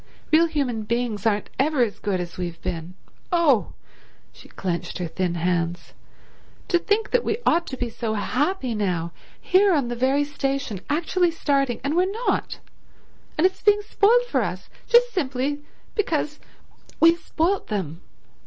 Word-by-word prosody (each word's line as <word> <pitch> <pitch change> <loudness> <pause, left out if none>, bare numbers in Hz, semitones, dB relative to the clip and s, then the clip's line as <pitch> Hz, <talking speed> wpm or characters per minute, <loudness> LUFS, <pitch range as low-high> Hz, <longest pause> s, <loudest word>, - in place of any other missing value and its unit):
Real 330 +2 +6
human 275 -8 -1
beings 225 -1 -1
aren't 210 -1 0
ever 280 -1 +3
as 215 -4 -3
good 200 -3 -1
as 175 -1 -5
we've 175 -2 -5
been. 175 -1 -4 0.4
Oh"—she 315 - -2
clenched 175 -2 -3
her 180 - -3
thin 175 +1 -2
hands—"to 175 - -3
think 415 +5 0
that - - +2
we 435 - 0
ought 335 +1 +3
to 260 - -5
be 245 - -2
so 225 -1 -3
happy 260 - -1
now, 180 -6 -1 0.3
here 380 0 +4
on 270 -5 0
the 240 - -2
very 265 +4 +2
station, 275 -7 -3
actually 345 +4 +2
starting, 275 -6 0
and 285 +3 0
we're 365 +2 +2
not, - - 0 0.8
and 310 - +3
it's 375 0 +1
being 415 0 +4
spoilt 450 +4 +3
for - - +1
us - - -4 0.2
just 485 0 +5
simply 285 -3 -1 0.3
because 305 -7 -1 0.6
we've 330 +1 +6
spoilt 350 +6 0
_them! 185 -7 -3
275 Hz, 150 wpm, -24 LUFS, 205-340 Hz, 0.8 s, Real